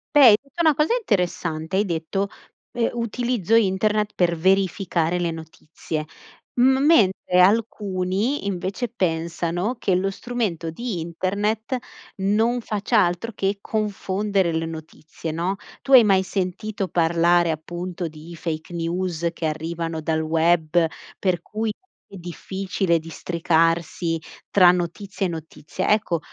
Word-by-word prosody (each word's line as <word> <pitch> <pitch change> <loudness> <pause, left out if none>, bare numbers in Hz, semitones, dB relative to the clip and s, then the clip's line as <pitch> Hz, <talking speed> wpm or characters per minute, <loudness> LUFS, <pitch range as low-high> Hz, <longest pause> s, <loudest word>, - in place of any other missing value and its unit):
Beh, - - +7
hai 210 -3 +9
detto 275 +4 -16
una 315 -3 +4
cosa 300 - +2
interessante, 180 - -1
hai 205 - +2
detto: 175 +3 -2 0.5
"Eh 235 -1 +1
utilizzo 235 -2 0
internet 210 0 +2
per 175 -1 +2
verificare 180 -1 +1
le 170 -1 0
notizie". 160 -1 -6 0.5
M 265 +2 +4
mentre 190 - +4
alcuni 200 +3 +1
invece 195 +5 -2
pensano 175 +1 -1
che 190 - +1
lo 195 +2 0
strumento 200 -7 -3
di 205 +3 -4
internet 205 +8 -1 0.4
non 220 +5 +2
faccia 215 0 0
altro 175 +7 -3
che 200 +1 -1
confondere 200 -3 -1
le 160 0 -1
notizie, 160 0 -7
no? 175 +4 -1 0.3
Tu 275 - -1
hai 250 -3 +10
mai 195 -3 +4
sentito 195 +2 -3
parlare 170 0 +3
appunto 175 +2 -5
di 155 +2 -11
fake 160 0 -5
news 170 0 -1
che 165 - -5
arrivano 160 +1 -3
dal 160 0 0
web, 165 +1 +2 0.3
per 180 -3 0
cui 215 +4 -3 0.4
è - - -7
difficile 185 0 -2
districarsi 165 0 0 0.3
tra 180 -3 +7
notizie 185 +3 -2
e - - -4
notizie. 160 +2 -5
Ecco, 210 -5 +2
185 Hz, 130 wpm, -23 LUFS, 165-210 Hz, 0.5 s, hai